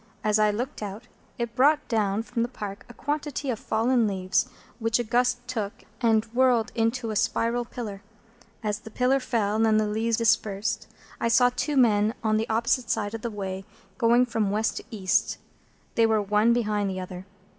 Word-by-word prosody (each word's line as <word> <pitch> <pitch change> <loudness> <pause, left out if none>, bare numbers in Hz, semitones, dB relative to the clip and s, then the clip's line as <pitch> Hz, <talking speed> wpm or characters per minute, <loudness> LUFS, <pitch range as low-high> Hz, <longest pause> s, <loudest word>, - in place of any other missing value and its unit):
As 215 0 +2
I 215 0 +4
looked 240 +6 -3
out, 210 +2 -6 0.3
it 235 -2 -3
brought 295 +4 +4
down 215 -2 0
from 235 0 -3
the 235 - +1
Park 205 -5 -7
a - - -10
quantity 290 -1 -2
of 225 - -4
fallen 230 +1 +2
leaves, 185 -2 0 0.3
which 225 0 +1
a 240 - -1
gust 245 +1 +1
took, 215 -5 -3 0.3
and 225 -2 +3
whirled 245 -3 +3
into 230 0 0
a - - -4
spiral 235 +3 +1
pillar. 215 -5 -6 0.6
As 210 -1 -1
the 220 - -11
pillar 255 +4 +2
fell 220 -4 0
and 220 -1 +4
the 215 - +1
leaves 220 +2 0
dispersed, 215 -2 +1 0.3
I - - +1
saw 245 +2 +5
two 290 +2 -1
men 220 -2 +4
on 215 -1 +2
the 220 - -2
opposite 230 +2 +1
side 210 -1 -1
of 225 - -5
the 235 - -3
way, 195 -3 -5 0.4
going 240 +1 +5
from 225 -4 -1
West 215 +2 0
to - - -5
East. 195 -6 0 0.6
They 230 -1 +4
were 220 -1 +3
one 210 +3 +3
behind 210 -4 +1
the 185 -1 -4
other. 185 +1 -7
225 Hz, 190 wpm, -26 LUFS, 210-240 Hz, 0.6 s, saw